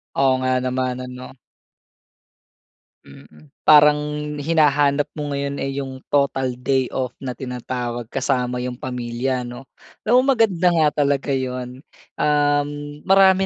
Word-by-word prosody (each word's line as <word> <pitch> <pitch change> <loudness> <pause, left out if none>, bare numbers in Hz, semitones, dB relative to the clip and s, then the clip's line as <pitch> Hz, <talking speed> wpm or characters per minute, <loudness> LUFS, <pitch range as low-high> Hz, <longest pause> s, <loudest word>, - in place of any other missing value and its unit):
Oo 135 -1 +3
nga 130 0 0
naman, 130 0 -1
ano? 125 +1 -10 1.7
Mm. 75 +2 -17
Parang 150 -1 +6 0.4
hinahanap 145 -2 +3
mo 150 -2 -4
ngayon, 140 0 -3
eh, 135 0 -3
yung 135 -1 -5
total 135 -3 +1
day 130 0 0
off 130 -2 -3
na 130 -2 -4
tinatawag 125 -2 -5
kasama 125 -2 -1
yung 125 0 -5
pamilya, 125 0 -3
'no? 120 +2 -9 0.3
Alam 245 +3 +4
mo 270 - +4
maganda 185 -7 +2
nga 160 -2 +4 0.2
talaga 140 0 0
'yon. 130 -1 -3 0.3
Um, 145 -1 +2 0.4
marami 190 0 +5
135 Hz, 125 wpm, -21 LUFS, 125-145 Hz, 1.7 s, Parang